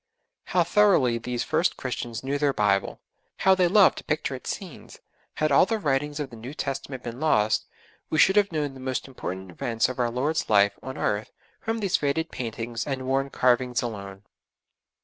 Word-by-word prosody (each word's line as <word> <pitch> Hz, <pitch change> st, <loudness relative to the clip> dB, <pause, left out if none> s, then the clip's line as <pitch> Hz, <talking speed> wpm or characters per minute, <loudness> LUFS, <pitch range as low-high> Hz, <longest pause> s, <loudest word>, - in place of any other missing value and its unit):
How 180 Hz, -, +2 dB
thoroughly 175 Hz, -, +3 dB
these 120 Hz, +1 st, -3 dB
first 165 Hz, +3 st, +1 dB
Christians 120 Hz, -2 st, -4 dB
knew 140 Hz, +2 st, -1 dB
their 145 Hz, -1 st, +2 dB
Bible! 105 Hz, -3 st, +1 dB, 0.4 s
How 190 Hz, -, +5 dB
they 185 Hz, -1 st, +3 dB
loved 195 Hz, +2 st, +5 dB
to -, -, -11 dB
picture 155 Hz, -2 st, -2 dB
its 130 Hz, -, -6 dB
scenes. 185 Hz, -6 st, -7 dB, 0.4 s
Had 155 Hz, -1 st, 0 dB
all 140 Hz, +6 st, +6 dB
the 225 Hz, -, 0 dB
writings 145 Hz, -4 st, -1 dB
of 140 Hz, -3 st, -4 dB
the -, -, -9 dB
New 120 Hz, +6 st, -8 dB
Testament 135 Hz, -2 st, -4 dB
been 120 Hz, +1 st, -6 dB
lost, 110 Hz, -9 st, +2 dB, 0.4 s
we 155 Hz, -, -1 dB
should 190 Hz, +5 st, +5 dB
have 205 Hz, -2 st, +3 dB
known 150 Hz, -3 st, -2 dB
the 135 Hz, -, -11 dB
most 130 Hz, 0 st, -3 dB
important 95 Hz, -8 st, -6 dB
events 115 Hz, +7 st, 0 dB
of 130 Hz, -, -6 dB
our 120 Hz, -1 st, +2 dB
Lord's 140 Hz, +7 st, -1 dB
life 100 Hz, -1 st, +5 dB
on 130 Hz, 0 st, -7 dB
earth 105 Hz, +1 st, -1 dB, 0.3 s
from 225 Hz, 0 st, -3 dB
these 195 Hz, -3 st, +2 dB
faded 155 Hz, +3 st, -1 dB
paintings 115 Hz, 0 st, -4 dB
and 130 Hz, -2 st, -3 dB
worn 135 Hz, +1 st, 0 dB
carvings 125 Hz, -1 st, +2 dB
alone. 100 Hz, -4 st, -6 dB
130 Hz, 190 wpm, -26 LUFS, 120-155 Hz, 0.4 s, all